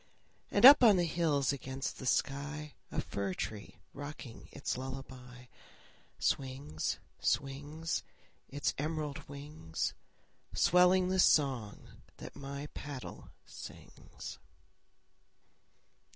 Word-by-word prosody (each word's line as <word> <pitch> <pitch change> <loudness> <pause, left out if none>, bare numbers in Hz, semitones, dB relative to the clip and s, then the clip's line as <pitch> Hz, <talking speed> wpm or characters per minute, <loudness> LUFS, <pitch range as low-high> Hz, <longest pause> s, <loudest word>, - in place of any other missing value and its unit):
And - - +5
up 275 -1 +11
on 215 -5 +8
the 175 - +3
hills 155 -4 +1
against 130 0 -4
the 130 - -4
sky, 145 +3 -1 0.2
A - - 0
fir 100 -2 -3
tree 105 -2 -5 0.2
rocking 145 -4 -8
its - - -3
lullaby, 130 -1 -8 0.7
Swings, 130 - -1 0.2
swings, 145 +4 -1 0.5
Its 145 +1 -1
emerald 150 -1 -2
wings, 140 - -4 0.6
Swelling 180 +1 +5
the 190 0 +1
song 130 - +2 0.2
that - - -9
my 140 0 -6
paddle 140 -3 -7 0.2
sings. - - -10
140 Hz, 95 wpm, -33 LUFS, 130-155 Hz, 0.7 s, up